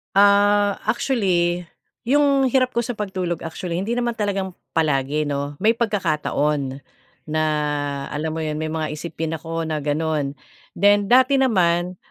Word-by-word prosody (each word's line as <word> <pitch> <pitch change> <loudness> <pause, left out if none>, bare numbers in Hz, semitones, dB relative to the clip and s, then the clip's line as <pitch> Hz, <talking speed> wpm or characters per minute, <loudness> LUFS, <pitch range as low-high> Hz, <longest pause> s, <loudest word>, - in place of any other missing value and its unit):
Ah, 205 0 +4
actually 185 -7 +1 0.4
'yung 280 +1 +3
hirap 255 -2 +2
ko 235 - +2
sa 245 - -3
pagtulog 190 -5 -3
actually 170 +2 -4
hindi 230 +5 -2
naman 240 -1 0
talagang 195 -3 -2 0.2
palagi 150 -1 +1
'no, 145 0 -3
may 220 +7 +3
pagkakataon, 150 - -1 0.4
na 155 0 -2 0.7
alam 155 +2 -3
mo 160 - -2
'yun, 155 0 -3
may 155 - -2
mga 155 -1 -3
isipin 160 0 -4
ako 165 +1 -4
na 155 -1 -2
gano'n 145 -1 -1 0.4
then 205 +1 +4
dati 260 +2 +5
naman, 180 -7 +2
175 Hz, 140 wpm, -22 LUFS, 155-210 Hz, 0.7 s, dati